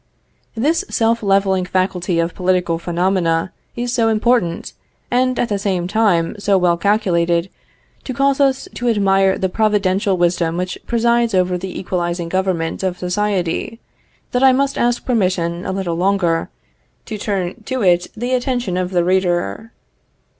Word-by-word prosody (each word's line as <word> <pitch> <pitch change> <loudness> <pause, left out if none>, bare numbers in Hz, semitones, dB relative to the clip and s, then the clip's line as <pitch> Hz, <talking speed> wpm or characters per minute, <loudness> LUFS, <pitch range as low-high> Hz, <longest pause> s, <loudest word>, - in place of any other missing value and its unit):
This 305 +9 +1
self 230 0 +1
leveling 195 -2 +2
faculty 185 -1 -1
of 165 0 0
political 180 -2 0
phenomena 175 0 0 0.2
is 240 0 -3
so 230 -2 +2
important, 220 -5 +1 0.4
and 255 +1 +1
at 240 - 0
the 205 -1 -1
same 185 -3 -1
time 195 -5 +1
so 200 -1 +2
well 175 -2 +3
calculated 175 -3 +1 0.5
to 260 - -4
cause 275 +1 +2
us 270 -2 +2
to 245 0 -1
admire 195 -3 +3
the 190 - 0
providential 200 -1 +1
wisdom 170 -1 +1
which 180 0 -3
presides 235 -1 +2
over 180 0 +2
the 180 +1 -5
equalizing 175 -2 -2
government 185 -3 -1
of 185 -2 -2
society, 185 +2 -2 0.5
that 250 - 0
I 265 -1 +7
must 275 +1 +1
ask 240 0 0
permission 180 -7 0
a - - -1
little 190 -3 -2
longer, 180 -3 +1 0.6
to 215 -2 -6
turn 200 0 -3
to 260 -3 -2
it 175 -2 +3
the 245 +3 -2
attention 245 -7 -1
of 180 -1 -1
the 180 -2 +1
reader. 180 - 0
190 Hz, 150 wpm, -18 LUFS, 175-225 Hz, 0.6 s, I